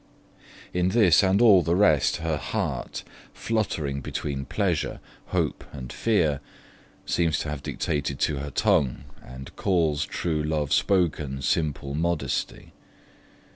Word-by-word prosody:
In 90 Hz, 0 st, +1 dB
this 100 Hz, -5 st, +5 dB
and 95 Hz, 0 st, +3 dB
all 100 Hz, -6 st, +7 dB
the 85 Hz, 0 st, +1 dB
rest 80 Hz, -8 st, +4 dB
her 80 Hz, -2 st, -2 dB
heart, -, -, -3 dB, 0.3 s
fluttering 80 Hz, -11 st, -2 dB
between 70 Hz, 0 st, -4 dB
pleasure, -, -, -1 dB, 0.3 s
hope, -, -, -1 dB
and 65 Hz, -4 st, -8 dB
fear, 80 Hz, -11 st, +1 dB, 0.7 s
seems 85 Hz, -2 st, +1 dB
to 75 Hz, -, -4 dB
have 75 Hz, -2 st, -5 dB
dictated 70 Hz, -1 st, -2 dB
to 75 Hz, -, +1 dB
her 70 Hz, +1 st, -4 dB
tongue, 65 Hz, -2 st, +1 dB, 0.2 s
and 65 Hz, +1 st, -10 dB
'calls 80 Hz, -6 st, +1 dB
true 80 Hz, -3 st, -2 dB
love 75 Hz, -2 st, -1 dB
spoken 75 Hz, -8 st, +1 dB
simple 70 Hz, -2 st, -1 dB
modesty'. 80 Hz, -3 st, -2 dB
75 Hz, 125 wpm, -25 LUFS, 70-90 Hz, 0.7 s, all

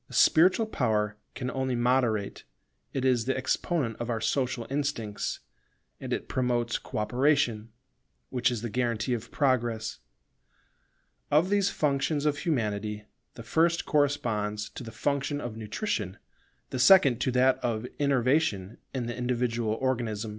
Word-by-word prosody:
The -, -, -9 dB
spiritual 185 Hz, +7 st, +5 dB
power 110 Hz, -, 0 dB, 0.2 s
can 125 Hz, 0 st, -3 dB
only 130 Hz, -1 st, -1 dB
moderate: 120 Hz, -4 st, +1 dB, 0.5 s
it 135 Hz, -1 st, -2 dB
is 125 Hz, -3 st, +2 dB
the 130 Hz, -, 0 dB
exponent 130 Hz, -, -1 dB
of 120 Hz, -, -4 dB
our 115 Hz, -2 st, 0 dB
social 125 Hz, 0 st, -1 dB
instincts, 135 Hz, -7 st, -3 dB, 0.6 s
and -, -, -7 dB
it -, -, -2 dB
promotes 120 Hz, -2 st, 0 dB
co -, -, -7 dB
operation, 120 Hz, -1 st, +1 dB, 0.6 s
which 125 Hz, -1 st, +2 dB
is 120 Hz, -2 st, -4 dB
the 120 Hz, -, -3 dB
guarantee 120 Hz, 0 st, 0 dB
of 120 Hz, -1 st, -4 dB
Progress. 120 Hz, -5 st, 0 dB, 1.3 s
Of 165 Hz, +6 st, +3 dB
these 200 Hz, -1 st, +3 dB
functions 145 Hz, +1 st, 0 dB
of 145 Hz, -1 st, +1 dB
Humanity 105 Hz, -7 st, -2 dB, 0.3 s
the 115 Hz, -, -9 dB
first 165 Hz, +8 st, +2 dB
corresponds 110 Hz, -8 st, 0 dB
to -, -, -8 dB
the 115 Hz, -, -8 dB
function 145 Hz, +2 st, -1 dB
of 120 Hz, -6 st, -5 dB
nutrition, 110 Hz, -, -3 dB, 0.5 s
the 130 Hz, -, -3 dB
second 140 Hz, -, +6 dB
to 130 Hz, -, +1 dB
that 130 Hz, +1 st, +4 dB
of 115 Hz, -2 st, -2 dB
innervation 130 Hz, -7 st, +1 dB, 0.2 s
in 125 Hz, -2 st, -1 dB
the 120 Hz, -, -4 dB
individual 120 Hz, -3 st, -1 dB
organism. 115 Hz, -4 st, -2 dB
125 Hz, 140 wpm, -28 LUFS, 110-140 Hz, 1.3 s, second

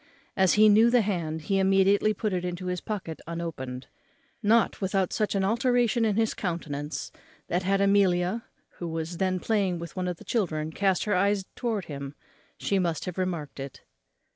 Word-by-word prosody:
As 190 Hz, -2 st, +4 dB
he 215 Hz, +1 st, +7 dB
knew 220 Hz, +3 st, +6 dB
the 245 Hz, 0 st, +4 dB
hand, 165 Hz, -6 st, -2 dB
he 195 Hz, +5 st, +1 dB
immediately 195 Hz, +2 st, +4 dB
put 215 Hz, -1 st, -2 dB
it 180 Hz, -1 st, -1 dB
into 180 Hz, +1 st, -4 dB
his 180 Hz, -1 st, -2 dB
pocket 190 Hz, -7 st, -5 dB
unopened, 140 Hz, -7 st, -5 dB, 0.6 s
not 225 Hz, +1 st, +3 dB
without 190 Hz, -1 st, 0 dB
such 210 Hz, -2 st, 0 dB
an 195 Hz, -, +1 dB
alteration 240 Hz, +2 st, +2 dB
in 210 Hz, -2 st, +1 dB
his 225 Hz, 0 st, +1 dB
countenance, 155 Hz, -5 st, -4 dB, 0.4 s
that 175 Hz, -, +1 dB
had 195 Hz, +1 st, +1 dB
Amelia, 195 Hz, +1 st, +3 dB, 0.4 s
who 175 Hz, -, -3 dB
was 165 Hz, +1 st, -4 dB
then 185 Hz, 0 st, 0 dB
playing 195 Hz, -4 st, 0 dB
with 170 Hz, -1 st, -8 dB
one 185 Hz, -1 st, -2 dB
of 180 Hz, -2 st, -3 dB
the -, -, -14 dB
children, 160 Hz, -9 st, -1 dB
cast 190 Hz, +2 st, +1 dB
her 210 Hz, -, 0 dB
eyes 200 Hz, +1 st, +2 dB
towards 220 Hz, -6 st, -2 dB
him, 140 Hz, -1 st, -7 dB, 0.4 s
she 195 Hz, -, 0 dB
must 170 Hz, -4 st, -1 dB
have 180 Hz, 0 st, -5 dB
remarked 170 Hz, -7 st, -3 dB
it. 135 Hz, -1 st, -8 dB
185 Hz, 180 wpm, -27 LUFS, 170-205 Hz, 0.6 s, he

